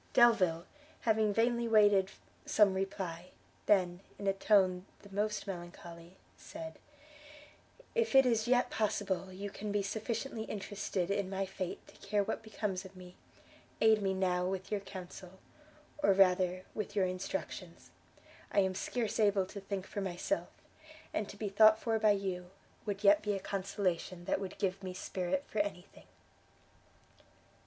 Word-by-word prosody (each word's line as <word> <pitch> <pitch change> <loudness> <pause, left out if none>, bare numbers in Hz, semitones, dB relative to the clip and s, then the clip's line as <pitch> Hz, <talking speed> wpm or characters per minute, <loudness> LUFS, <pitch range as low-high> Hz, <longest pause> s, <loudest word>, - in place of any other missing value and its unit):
Delvile, 190 -9 +5 0.4
having 220 -2 +2
vainly 235 +2 +2
waited 205 -3 +5 0.3
some 205 -3 +4
reply, 190 -3 -3 0.4
then 180 -4 +3 0.2
in 200 - -7
a 195 - +3
tone 190 -2 +3 0.2
the 200 - -14
most 210 +1 -1
melancholy, 175 -1 -9 0.2
said, 160 0 -9 1.1
"If 465 - +1
it 270 0 +8
is 230 -2 +2
yet 250 0 +3
possible 200 -3 -1
you 200 +2 -6
can 210 +1 -5
be 205 0 +1
sufficiently 220 +3 -3
interested 200 -3 -3
in 200 -1 0
my 195 0 -1
fate 185 -1 -5
to - - -17
care 205 0 +2
what - - -3
becomes 210 -4 -3
of 190 0 -12
me, 180 -1 -12 0.6
aid 220 -1 +5
me 190 -1 0
now 180 -1 +1
with 190 0 -4
your 210 - +1
counsel, 185 -1 -10 0.6
or 200 - +5
rather 185 -1 +3
with 210 -1 -4
your 195 -2 +3
instructions; 185 +1 -5 0.6
I 200 - +4
am 190 -1 +1
scarce 225 +4 -2
able 205 -3 +3
to 200 +2 -8
think 195 -1 -4
for 200 - -5
myself, 195 +10 -2 0.6
and 210 -1 -2
to - - -10
be 210 - -3
thought 215 +2 +6
for 225 0 0
by 215 -1 +5
you, 185 -3 -3 0.4
would 205 0 -3
yet 205 0 +6
be 210 0 -1
a 195 - -2
consolation 185 -2 -2
that - - 0
would 190 - -6
give 190 0 -1
me 185 -1 -6
spirit 185 +8 -2
for 215 - -3
any 200 -3 -1
thing." - - -17
195 Hz, 155 wpm, -33 LUFS, 185-210 Hz, 1.1 s, it